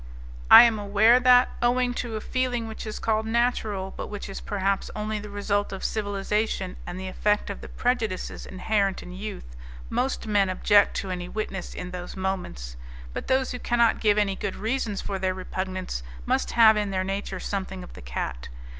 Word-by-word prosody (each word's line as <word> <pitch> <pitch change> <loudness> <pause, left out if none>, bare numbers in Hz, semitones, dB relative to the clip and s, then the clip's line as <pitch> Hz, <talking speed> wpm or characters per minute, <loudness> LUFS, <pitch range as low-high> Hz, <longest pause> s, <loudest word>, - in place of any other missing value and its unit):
I - - +12
am 230 -3 +3
aware 210 +4 +5
that, 250 0 +6
owing 245 +1 +2
to 235 -3 -5
a 215 - -3
feeling 250 -2 -1
which 220 0 -7
is 215 - -5
called 220 0 0
natural, 220 -5 0
but - - -5
which 205 -1 -6
is 195 - -6
perhaps 195 -1 -1
only 215 0 -2
the 210 0 -8
result 205 0 -1
of 195 - -6
civilization 205 -2 -1
and 175 +1 -5
the 190 - -5
effect 210 +2 0
of 200 - -8
the - - -9
prejudices 230 -6 -2
inherent 195 +1 0
in 180 - -10
youth, 185 - -7 0.4
most 260 -1 -1
men 205 -3 +2
object 205 +2 +4
to 190 - -3
any 180 -1 -4
witness 195 -3 -4
in 180 0 -6
those 180 +1 -7
moments, 175 - -4 0.4
but - - -5
those 260 0 +2
who 250 - -4
cannot 235 -2 +2
give 210 -2 +3
any 200 -2 +2
good 195 0 -4
reasons 220 -2 -2
for 195 -1 -4
their 185 0 0
repugnance 185 - -4 0.2
must - - +1
have 225 -2 +7
in 210 -1 0
their 190 -1 -1
nature 195 0 -3
something 190 -2 -4
of - - -12
the - - -11
cat. - - -5
205 Hz, 190 wpm, -26 LUFS, 190-220 Hz, 0.4 s, I